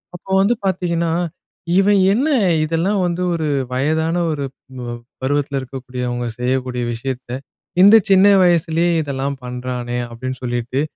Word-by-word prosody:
அப்ப 175 - -12
வந்து 205 +5 +3
பார்த்தீங்கன்னா, 170 -3 0 0.7
"இவன் 200 +1 +4
என்ன 255 +8 +1 0.4
இதெல்லாம் 165 +6 0
வந்து 175 0 -2
ஒரு 160 -2 -1 0.3
வயதான 160 +5 0 0.2
ஒரு 145 -2 -2
ப் 130 -2 -13
அ - - -4 0.3
பருவத்தில 140 0 0
இருக்கக்கூடியவங்க 125 -2 -4
செய்யக்கூடிய 125 0 -1
விஷயத்த, 125 +1 -5 0.5
இந்த 205 +3 +9 0.2
சின்ன 195 +1 +7 0.2
வயசுலேயே 170 0 +2
இதெல்லாம் 140 0 -3
பண்றானே!" 125 -1 -4
அப்படீன்னு 130 +2 -6
சொல்லிட்டு. 120 +2 -2
140 Hz, 125 wpm, -19 LUFS, 125-170 Hz, 0.7 s, இந்த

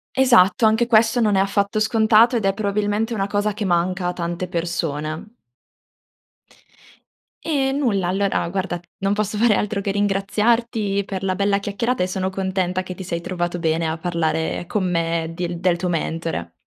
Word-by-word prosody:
Esatto, 235 -5 +5
anche 220 +2 +3
questo 225 0 +4
non 210 -3 +2
è - - +3
affatto 200 +1 0
scontato 220 +2 +4
ed 215 - -2
è 195 - +2
probabilmente 210 +2 -1
una 195 -3 -1
cosa 205 +1 0
che 210 +1 -4
manca 180 0 0
a 180 - -1
tante 175 +1 -4
persone. 165 +2 -3 2.1
E 275 -4 0
nulla, 235 -10 0
allora, 190 -1 0
guarda, 185 -1 -3 0.2
non 195 +1 +1
posso 210 0 -2
fare 225 -1 +4
altro 210 0 -1
che 200 0 -2
ringraziarti 205 +1 0
per 195 -1 -5
la 190 -1 0
bella 200 +1 +1
chiacchierata, 220 +5 -2
e - - 0
sono 185 0 -2
contenta 190 -1 -1
che 185 0 -7
ti 190 - -7
sei 170 -1 -4
trovato 175 0 -3
bene 165 0 0
a 160 +1 -2
parlare 160 -1 -1
con 190 -2 -1
me 165 -1 -1
dil 175 0 -4
del 175 -1 +2
tuo 180 +1 -2
mentore. 165 - -3
195 Hz, 170 wpm, -21 LUFS, 175-215 Hz, 2.1 s, Esatto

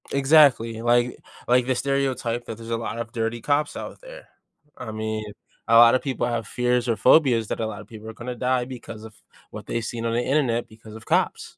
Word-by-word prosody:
Exactly, 135 -5 +4
like 120 +1 +2 0.3
like 125 0 +3
the 130 - +1
stereotype 130 -3 -1
that 115 - -7
there's 115 0 -10
a - - +1
lot 115 0 -5
of 115 0 -5
dirty 115 0 -2
cops 145 +4 0
out - - -8
there. - - -12 0.5
I 110 - -7
mean, 110 0 -4 0.4
a 115 0 +5
lotta 120 +2 +7
people 130 -3 -2
have 115 -3 -3
fears 125 0 0
or 115 - +2
phobias 125 -6 +4
that - - -4
a 110 - -1
lotta 105 -1 -8
people 110 +1 -11
are - - -8
gonna 125 +2 -7
die 125 0 0
because 120 -4 -9
of 110 0 -11 0.4
what - - -9
they've 115 -1 -3
seen 115 0 -5
on 115 - -1
the 120 - +1
internet 125 -3 0
because 110 0 -14
of 110 - -12
cops. - - -1
120 Hz, 215 wpm, -24 LUFS, 115-130 Hz, 0.5 s, lotta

